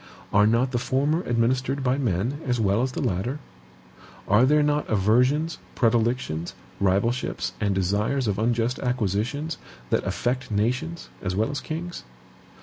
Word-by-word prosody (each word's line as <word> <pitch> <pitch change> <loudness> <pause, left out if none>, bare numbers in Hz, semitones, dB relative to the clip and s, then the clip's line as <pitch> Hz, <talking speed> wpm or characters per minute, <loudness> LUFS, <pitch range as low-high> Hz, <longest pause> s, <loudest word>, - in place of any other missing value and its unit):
Are 105 +1 +5
not 120 +4 +2
the 120 - 0
former 140 +6 +1
administered 130 +3 0
by 130 +1 +1
MEN 120 - -1
as 125 -1 +1
well 100 +1 +2
as 130 0 -1
the - - -2
latter? 100 +10 -1 0.9
Are 105 +5 +5
there 150 +1 +4
not 150 0 0
aversions, 125 - +2 0.2
predilections, 115 -8 0 0.2
rivalships, 100 +6 0
and 100 -2 +1
desires 105 +7 0
of 100 -1 0
unjust 120 +2 +1
acquisitions, 125 - -1 0.3
that - - +2
affect 125 +2 -2
nations 125 +11 -1
as 90 -1 -2
well 110 +7 +1
as 145 -1 -3
kings? 170 +3 -5
120 Hz, 145 wpm, -25 LUFS, 105-135 Hz, 0.9 s, Are